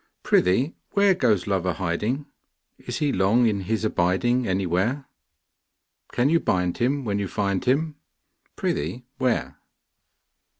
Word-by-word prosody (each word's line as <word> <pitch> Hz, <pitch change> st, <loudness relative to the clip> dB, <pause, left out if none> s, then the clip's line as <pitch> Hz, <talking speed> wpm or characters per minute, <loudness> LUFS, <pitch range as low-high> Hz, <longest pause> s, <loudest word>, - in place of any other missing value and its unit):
Prithee 120 Hz, -, +2 dB, 0.2 s
where, 200 Hz, -1 st, +5 dB
Goes 110 Hz, -, +1 dB
Love 95 Hz, -3 st, 0 dB
a 90 Hz, -, +1 dB
hiding? 105 Hz, -, -2 dB, 0.5 s
Is -, -, -5 dB
he 145 Hz, -2 st, 0 dB
long 100 Hz, +6 st, +3 dB
in 105 Hz, -3 st, +1 dB
his 110 Hz, +3 st, -2 dB
abiding 110 Hz, +6 st, +1 dB
Anywhere? 95 Hz, +9 st, 0 dB, 1.1 s
Can 125 Hz, +2 st, +2 dB
you 165 Hz, +3 st, +3 dB
bind 90 Hz, -, 0 dB
him 135 Hz, +3 st, 0 dB
when 100 Hz, -2 st, -1 dB
you 100 Hz, -, -2 dB
find 100 Hz, +2 st, -1 dB
him; 145 Hz, +4 st, +1 dB, 0.6 s
Prithee, 85 Hz, +12 st, -2 dB, 0.2 s
where? 125 Hz, -3 st, -1 dB
110 Hz, 130 wpm, -24 LUFS, 95-130 Hz, 1.1 s, where